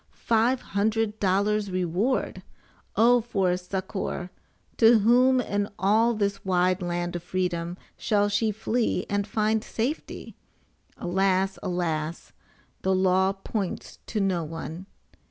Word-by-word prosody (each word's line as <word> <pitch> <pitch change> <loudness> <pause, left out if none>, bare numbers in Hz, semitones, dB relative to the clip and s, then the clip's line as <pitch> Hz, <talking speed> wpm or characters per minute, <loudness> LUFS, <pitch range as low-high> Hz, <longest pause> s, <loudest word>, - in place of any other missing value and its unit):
FIVE 235 +3 +1
HUNDRED 215 +1 -1
DOLLARS 200 +2 +1
REWARD! 185 +7 -1 0.5
OH, 240 +2 +5
FOR 195 -6 0
SUCCOR! 185 0 -4 0.4
TO 230 0 +6
WHOM 250 +4 +4
IN 205 -4 -1
ALL 220 +5 +3
THIS 200 -1 -1
WIDE 185 -1 +1
LAND 175 0 -2
OF 175 - -3
FREEDOM 175 -1 -2 0.2
SHALL 205 -1 +2
SHE 215 +2 +1
FLEE 225 +3 -1
AND 205 0 0
FIND 215 0 +1
SAFETY? 255 +8 -4 0.6
ALAS! 190 +1 +1
ALAS! 170 -4 -3 0.5
THE 190 0 +1
LAW 190 +1 +3
POINTS 195 0 -5
TO 220 - -2
NO 190 -4 +1
ONE! 165 +3 -7
195 Hz, 120 wpm, -26 LUFS, 180-220 Hz, 0.6 s, TO